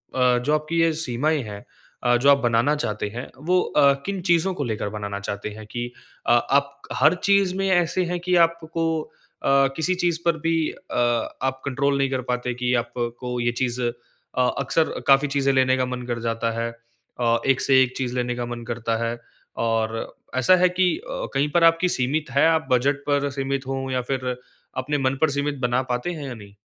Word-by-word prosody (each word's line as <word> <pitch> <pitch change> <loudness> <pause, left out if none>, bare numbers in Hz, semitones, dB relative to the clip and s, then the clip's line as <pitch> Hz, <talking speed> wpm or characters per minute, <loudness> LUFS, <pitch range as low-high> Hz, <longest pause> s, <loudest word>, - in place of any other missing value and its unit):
अ, 125 -1 +4
जो 150 - +2
आपकी 155 +2 0
ये 165 - +4
सीमाएँ 155 0 0
हैं 105 -1 -8 0.4
अ, 120 0 +4
जो 140 +4 +3
आप 140 - +7
बनाना 120 +3 +2
चाहते 105 -8 -2
हैं, 120 +4 -6 0.2
वो 180 +1 +3
अ, 140 -1 +4
किन 195 -1 -3
चीज़ों 170 +3 +3
को 145 - -3
लेकर 110 -4 -2
बनाना 100 -1 -5
चाहते 100 +1 -4
हैं 110 0 -10
कि 120 0 -4 0.4
अ, - - +4
आप 140 +3 +1
हर 155 +3 +4 0.2
चीज़ 195 -2 +4
में 195 0 0
ऐसे 180 0 +2
हैं 175 - -1
कि 180 +1 0
आपको 165 0 -4 0.6
अ, - - -1 0.3
किसी 160 +4 +1
चीज़ 175 -2 0
पर 170 -1 +2
भी 165 - +2 0.2
अ, 185 - -11 0.5
आप 130 0 -1
कंट्रोल 140 +1 +1
नहीं 135 -1 +1
कर 130 -1 -1
पाते 125 0 -1
कि 125 +1 -1
आपको 120 +1 -4
ये 120 0 +1
चीज़ 125 0 -1
अ, 120 - +1 0.7
अक्सर 150 +4 0
काफ़ी 135 +1 +5
चीज़ें 140 -1 +1
लेने 130 0 +3
का 130 - +1
मन 125 0 -4
कर 120 -1 -2
जाता 115 0 -1
है 115 - -1 0.5
अ, 115 -1 +2
एक 135 -1 +3
से 130 -1 +5
एक 125 0 -4
चीज़ 125 -1 -2
लेने 125 0 -1
का 120 0 -3
मन 120 0 -6
करता 115 -1 -2
है 115 +1 -2 0.5
और 115 -1 +1 0.4
ऐसा 130 +8 +5
है 180 +1 +4
कि 180 0 +2
अ, - - -5
कहीं 140 +2 +1
पर 170 +1 +3
आपकी 165 +2 +4
सीमित 145 +2 -1
है, 140 +3 +4
आप 160 -2 +2
बजट 135 +3 +2
पर 145 0 +1
सीमित 135 0 -2
हों 135 0 -3
या 130 -1 0
फिर 130 -1 -2 0.5
अपने 145 +3 -1
मन 135 -1 +1
पर 160 - +4
सीमित 140 0 -2
बना 125 0 +1
पाते 125 +8 -2
हैं 150 -4 -6
या 130 - -5
नहीं? 100 -2 -13
135 Hz, 205 wpm, -23 LUFS, 120-155 Hz, 0.7 s, आप